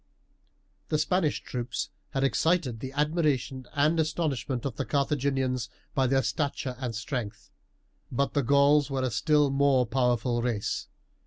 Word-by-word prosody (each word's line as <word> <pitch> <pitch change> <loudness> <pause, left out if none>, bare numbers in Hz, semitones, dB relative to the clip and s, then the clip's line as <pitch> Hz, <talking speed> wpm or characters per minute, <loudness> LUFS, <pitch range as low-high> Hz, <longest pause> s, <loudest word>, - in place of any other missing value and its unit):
The 155 - +2
Spanish 155 0 +1
troops 125 -1 -4 0.2
had 135 - -1
excited 140 -3 +1
the 130 +3 -6
admiration 145 -4 0
and 150 +3 +3
astonishment 145 -6 -1
of 130 -5 -3
the - - -2
Carthaginians 135 -4 0 0.2
by 135 -1 +2
their 135 +1 +2
stature 130 +1 -2
and 125 -4 -3
strength; 115 -3 -5 0.6
but 140 +3 0
the 145 - +2
Gauls 140 +2 +4
were 135 -1 -1
a 130 - 0
still 145 +4 +3
more 135 -2 +3
powerful 120 0 +1
race. 115 -4 -2
135 Hz, 140 wpm, -28 LUFS, 125-145 Hz, 0.6 s, Gauls